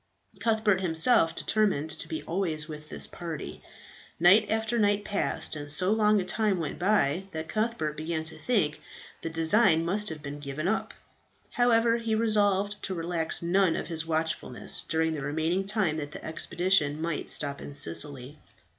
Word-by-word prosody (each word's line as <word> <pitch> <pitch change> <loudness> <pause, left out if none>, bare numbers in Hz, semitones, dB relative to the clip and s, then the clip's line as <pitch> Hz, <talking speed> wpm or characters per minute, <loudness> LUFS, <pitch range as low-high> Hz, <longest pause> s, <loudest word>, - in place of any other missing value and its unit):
Cuthbert 215 -3 +1
himself 165 +1 +3
determined 195 -8 0
to - - -3
be 320 - -5
always 165 -4 -1
with 155 -1 -9
this - - -3
party. 165 -3 -7 0.6
Night 195 +5 +6
after 220 +2 0
night 205 -1 +2
passed, 205 -5 -1
and 145 -1 -5
so 185 +6 +3
long 215 -1 +3
a 185 - -2
time 210 0 +1
went 155 -4 -4
by 185 -3 +2
that 160 0 -5
Cuthbert 215 -9 -2
began 160 +1 -3
to 160 - -7
think 195 -12 0 0.4
the 165 - -4
design 165 +1 +3
must 205 +4 0
have 155 -2 -8
been 145 0 -6
given 145 +3 -4
up. 220 - -1 0.6
However, 235 -1 +3
he 230 -2 -1
resolved 205 -2 +2
to 190 - -3
relax 165 -1 0
none 180 0 +2
of - - -4
his 165 -2 -1
watchfulness 160 -6 0
during 160 0 +1
the 150 - -4
remaining 160 +7 -1
time 200 -7 +1
that 145 -1 -6
the - - -9
expedition 160 -2 +1
might 165 -2 -3
stop 140 -1 -2
in - - -8
Sicily. 140 - -1
170 Hz, 165 wpm, -28 LUFS, 155-210 Hz, 0.6 s, Night